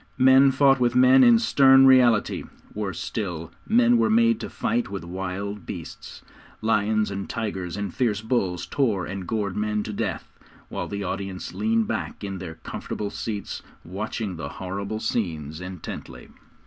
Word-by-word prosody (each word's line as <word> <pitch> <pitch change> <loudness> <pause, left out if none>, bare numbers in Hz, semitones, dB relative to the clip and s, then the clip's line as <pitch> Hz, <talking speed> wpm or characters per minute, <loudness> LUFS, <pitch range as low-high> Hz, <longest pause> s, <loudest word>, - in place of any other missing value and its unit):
Men 130 +1 +6
fought 135 0 +4
with 120 -1 +1
men 130 +1 +7
in 120 -2 +7
stern 135 +3 +6
reality; 125 -5 +4 0.3
worse 100 -5 -4
still, 85 -7 -4 0.2
men 240 +1 +5
were 230 -1 +3
made 230 0 +4
to - - -6
fight 120 0 -1
with 100 -2 -5
wild 95 +2 -5
beasts. - - -8 0.4
Lions 110 -1 +1
and 100 0 -5
tigers, 100 -6 -4
and 100 -3 -4
fierce 110 -5 0
bulls 100 -6 -1
tore 110 -10 0
and 95 -2 -6
gored 105 -4 -2
men 105 0 -1
to 105 - -6
death, - - -4 0.4
while - - -4
the 100 0 -4
audience 95 0 -5
leaned 225 0 +1
back - - -4
in 95 -2 -4
their 85 -3 -7
comfortable 105 -1 -5
seats, 105 -3 -5 0.2
watching 100 +1 -4
the 85 - -5
horrible 100 +3 -5
scenes 80 -9 -3
intently. 90 -2 -8
105 Hz, 155 wpm, -24 LUFS, 95-125 Hz, 0.4 s, men